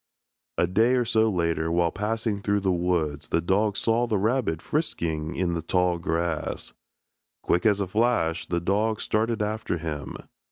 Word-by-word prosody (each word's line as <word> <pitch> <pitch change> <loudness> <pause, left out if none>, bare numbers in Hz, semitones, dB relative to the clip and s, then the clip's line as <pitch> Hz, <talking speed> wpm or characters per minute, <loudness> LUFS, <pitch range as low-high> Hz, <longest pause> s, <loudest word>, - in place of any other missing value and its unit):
A - - +3
day 110 +8 +3
or 125 -1 +2
so 110 -1 +3
later 85 -3 0
while 85 0 +2
passing 105 0 -2
through 100 0 +1
the 95 -1 +1
woods 85 -4 -1
the - - +1
dog 100 +4 +1
saw 115 +1 +2
the 110 -3 +1
rabbit 110 -5 0
frisking 80 - -2
in 90 -2 0
the 85 - -2
tall 90 +1 +1
grass. 85 -2 -2 0.7
Quick 90 +5 +2
as 105 -2 +3
a 100 - 0
flash 95 -5 +1
the 85 - 0
dog 105 +5 0
started 110 0 0
after 110 -3 -2
him. 75 -4 -5
95 Hz, 165 wpm, -26 LUFS, 85-110 Hz, 0.7 s, A